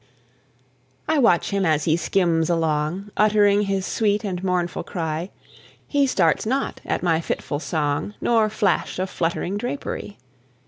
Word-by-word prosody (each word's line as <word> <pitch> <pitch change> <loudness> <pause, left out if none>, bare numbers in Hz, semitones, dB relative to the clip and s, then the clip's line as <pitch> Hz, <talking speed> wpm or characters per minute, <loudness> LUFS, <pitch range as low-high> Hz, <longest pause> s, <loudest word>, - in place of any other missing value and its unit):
I 315 -1 +2
watch 210 -9 +3
him 200 -1 0
as 155 -3 +2
he 160 - +2
skims 170 -2 +1
along, 165 +4 -1
Uttering 205 -1 +4
his 195 -1 -1
sweet 210 -1 0
and 185 -3 -3
mournful 180 -2 -1
cry; 165 0 -3 0.6
He 285 -2 +2
starts 170 - +2
not 265 +5 -2
at - - -1
my 165 -2 +2
fitful 145 -3 -3
song, 150 +5 -2
Nor 225 -2 +2
flash 205 -5 0
of 185 +1 -2
fluttering 175 +4 -2
drapery. 245 -4 -5
185 Hz, 140 wpm, -23 LUFS, 165-210 Hz, 0.6 s, Uttering